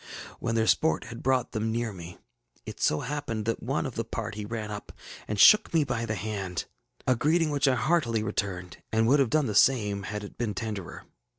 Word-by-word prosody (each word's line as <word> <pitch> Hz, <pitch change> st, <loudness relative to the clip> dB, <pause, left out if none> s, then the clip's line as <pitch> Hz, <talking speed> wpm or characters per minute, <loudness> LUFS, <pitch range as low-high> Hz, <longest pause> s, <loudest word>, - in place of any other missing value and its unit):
When 115 Hz, -, -1 dB
their 110 Hz, -1 st, +2 dB
sport 160 Hz, +7 st, +2 dB
had 115 Hz, +1 st, -9 dB
brought 130 Hz, -2 st, +1 dB
them 110 Hz, 0 st, -1 dB
near 115 Hz, -1 st, -2 dB
me, 85 Hz, -1 st, -10 dB, 0.5 s
it -, -, -8 dB
so 75 Hz, -, +2 dB
happened 125 Hz, -6 st, -3 dB
that 115 Hz, -, -1 dB
one 135 Hz, +6 st, -1 dB
of 130 Hz, -, -4 dB
the 115 Hz, -, -2 dB
party 110 Hz, -2 st, -5 dB
ran 110 Hz, -1 st, -4 dB
up 105 Hz, -, -7 dB, 0.4 s
and 105 Hz, -1 st, -3 dB
shook 215 Hz, -, +7 dB
me 160 Hz, -, +5 dB
by 120 Hz, -4 st, -2 dB
the 110 Hz, -, -1 dB
band, 100 Hz, -3 st, -4 dB, 0.4 s
a 130 Hz, -, +3 dB
greeting 155 Hz, +5 st, +2 dB
which 145 Hz, -1 st, +2 dB
I 130 Hz, -, +4 dB
heartily 125 Hz, -4 st, +1 dB
returned, 95 Hz, -4 st, -3 dB
and 110 Hz, 0 st, +2 dB
would 140 Hz, +4 st, +5 dB
have 135 Hz, -4 st, +3 dB
done 155 Hz, +3 st, +2 dB
the 110 Hz, -, -2 dB
same 105 Hz, -3 st, +3 dB
had 105 Hz, 0 st, -4 dB
it 100 Hz, -, -11 dB
been 110 Hz, -4 st, -2 dB
tenderer. 105 Hz, -4 st, -5 dB
115 Hz, 210 wpm, -28 LUFS, 105-130 Hz, 0.5 s, shook